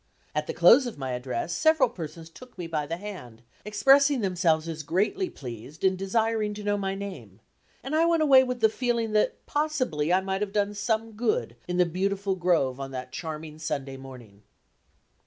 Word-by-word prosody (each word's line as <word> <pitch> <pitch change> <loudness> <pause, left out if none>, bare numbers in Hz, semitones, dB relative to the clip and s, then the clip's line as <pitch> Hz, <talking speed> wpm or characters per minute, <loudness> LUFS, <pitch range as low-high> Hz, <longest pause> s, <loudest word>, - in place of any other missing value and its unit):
At 150 0 -2
the - - -3
close 240 +10 +6
of 235 - -7
my 135 -2 -4
address 125 +6 -3
several 315 - +4
persons 165 -7 -8
took 255 +7 -15
me 175 - -5
by 155 -3 -2
the 165 +3 -3
hand, 175 - -9 0.2
expressing 270 +6 +4
themselves 170 -5 +1
as 160 -1 -4
greatly 205 - 0
pleased 125 - -9
and 190 -1 +4
desiring 215 +2 0
to 210 - -7
know 205 0 +1
my 195 -1 -2
name; 180 - -8 0.4
and 270 - -5
I 330 +1 +4
went 335 -2 +3
away 270 -3 +7
with 250 -2 -4
the 220 - +7
feeling 235 -1 -1
that 215 0 0
possibly 255 - -1
I 185 - +5
might 190 +1 -3
have 205 -1 -2
done 205 -1 +1
some 220 +2 -1
good 245 - -1
in 180 0 -2
the 180 - +5
beautiful 195 +3 -1
grove 170 -8 +1
on 135 0 -5
that 130 -1 -7
charming 155 0 -6
Sunday 140 -4 -3
morning. 125 -6 -12
190 Hz, 190 wpm, -27 LUFS, 155-225 Hz, 0.4 s, away